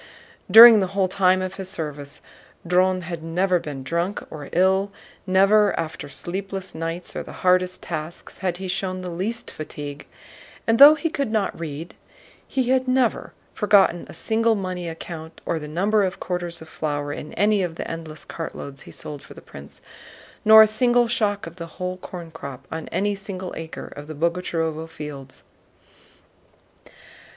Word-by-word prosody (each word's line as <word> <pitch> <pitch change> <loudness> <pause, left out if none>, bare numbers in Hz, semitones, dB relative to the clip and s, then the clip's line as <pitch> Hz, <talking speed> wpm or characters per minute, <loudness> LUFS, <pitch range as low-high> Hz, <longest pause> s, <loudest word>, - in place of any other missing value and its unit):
During 230 -1 +11
the 195 0 -3
whole 190 -1 +3
time 185 0 +2
of 185 0 -5
his 190 -1 -5
service 145 -5 -6 0.4
Dron 185 +1 +2
had 170 -1 -6
never 180 +3 +1
been 145 -4 -7
drunk 170 +8 -2
or 145 -3 -8
ill, 190 +3 +2 0.4
never 195 +2 +4
after 155 -2 -5
sleepless 190 +5 -5
nights 165 +2 -5
or - - -2
the - - -10
hardest 185 0 +2
tasks 160 0 -6
had 180 -3 -1
he 190 0 -6
shown 185 0 -2
the 180 -1 -5
least 205 +7 -3
fatigue, 145 -1 -8 0.6
and 225 0 +2
though 290 +2 +11
he 310 +1 -2
could 280 -7 -2
not 215 -6 -1
read 160 0 -6 0.5
he 255 -2 -1
had 260 0 +2
never 255 -2 +1 0.2
forgotten 200 -4 +3
a - - -9
single 225 0 +1
money 185 -3 -4
account 160 0 -8
or 165 - -1
the 150 - -7
number 200 +7 +1
of 185 -1 -2
quarters 175 -2 -4
of - - -15
flour 145 -2 -3
in 150 - -7
any 205 +2 +3
of 175 -3 -3
the - - -5
endless 160 -2 -7
cartloads 140 -4 -7
he - - -12
sold 145 -2 -7
for - - -14
the - - -10
prince, 70 0 -13 0.6
nor 220 0 +10
a - - +6
single 240 +2 +2
shock 210 -4 0
of 165 +1 -10
the 170 -1 -6
whole 180 0 -3
corn 175 -2 -9
crop 135 -3 -9
on 160 0 -5
any 205 +1 0
single 195 -2 -6
acre 160 0 -7
of 145 0 -9
the 155 - -7
Boguchárovo 165 -1 -2
fields. 145 -4 -9
180 Hz, 170 wpm, -23 LUFS, 160-200 Hz, 0.6 s, During